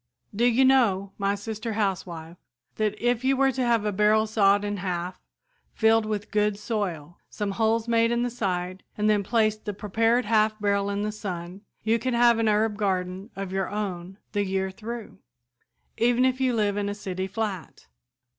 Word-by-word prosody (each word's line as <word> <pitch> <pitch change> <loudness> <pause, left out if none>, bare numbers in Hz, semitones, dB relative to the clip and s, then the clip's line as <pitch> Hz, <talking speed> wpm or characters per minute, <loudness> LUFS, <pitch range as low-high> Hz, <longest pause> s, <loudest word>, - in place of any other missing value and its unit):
"Do 235 +4 +2
you 245 +2 +4
know, 210 -8 +3
my 200 0 +1
sister 220 +2 -5
housewife, 180 -5 -3 0.4
that 215 -1 -1
if 240 0 +1
you 265 0 +2
were 270 0 +4
to 260 - -3
have 235 -3 +2
a 210 - +1
barrel 210 +2 +3
sawed 205 -2 +3
in 205 0 -2
half, 180 -1 -4 0.5
filled 220 -1 +3
with 210 -1 -3
good 210 -1 +1
soil, 185 -8 -4
some 205 -1 -3
holes 225 +2 +1
made 230 0 +3
in 235 0 +1
the 245 - -1
side 185 -5 -3 0.2
and 210 0 +1
then 210 -1 +3
placed 215 0 0
the 210 -2 -3
prepared 225 +4 +1
half 215 0 +2
barrel 200 -1 +1
in 200 0 -2
the 215 - -1
sun, 185 -3 -6 0.2
you 225 +1 +2
could 255 +1 -1
have 235 -1 +5
an 225 -1 +2
herb 210 0 +1
garden 190 0 -2
of 195 -1 -5
your 190 -1 -1
own 190 -3 -4
the 205 - 0
year 190 0 -1
through, 225 +1 -8 0.8
even 245 +2 +3
if 260 0 0
you 255 -2 +2
live 205 -2 +1
in 205 0 -1
a 205 - -3
city 190 -2 -4
flat? 200 -3 -5
210 Hz, 185 wpm, -26 LUFS, 195-225 Hz, 0.8 s, have